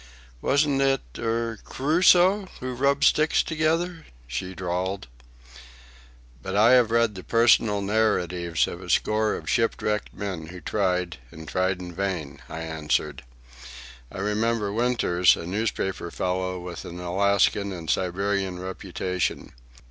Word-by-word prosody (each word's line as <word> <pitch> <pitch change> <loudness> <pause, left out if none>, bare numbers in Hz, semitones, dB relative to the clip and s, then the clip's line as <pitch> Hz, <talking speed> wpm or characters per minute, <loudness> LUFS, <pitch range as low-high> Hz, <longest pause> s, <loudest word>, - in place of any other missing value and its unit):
"Wasn't 140 -1 +2
it—er—Crusoe 135 - +2
who 130 0 -4
rubbed 140 +3 +1
sticks 155 +1 +4
together?" 165 +2 -1 0.2
she 70 +10 -5
drawled. 95 +2 -3 1.4
"But 95 +9 -4
I 110 +4 +6
have 125 -3 +5
read 115 -1 +2
the 95 -2 -9
personal 115 -3 +3
narratives 90 -5 +1
of 85 - -7
a 90 - -10
score 110 +5 +2
of - - -8
shipwrecked 105 -3 0
men 95 -6 -5
who 90 +2 -9
tried, 90 -2 -1
and 80 +4 -11
tried 95 +2 0
in 90 -1 -8
vain," 90 -6 -3
I 80 - -6
answered. 75 -3 -2 0.9
"I - - -9
remember 105 0 0
Winters, 110 -7 +3
a - - -7
newspaper 95 -2 -2
fellow 90 +1 -2
with 90 -1 -7
an 85 +1 -8
Alaskan 100 +2 +1
and 85 -3 -7
Siberian 95 +1 -1
reputation. 90 -1 -3
100 Hz, 125 wpm, -25 LUFS, 90-115 Hz, 1.4 s, I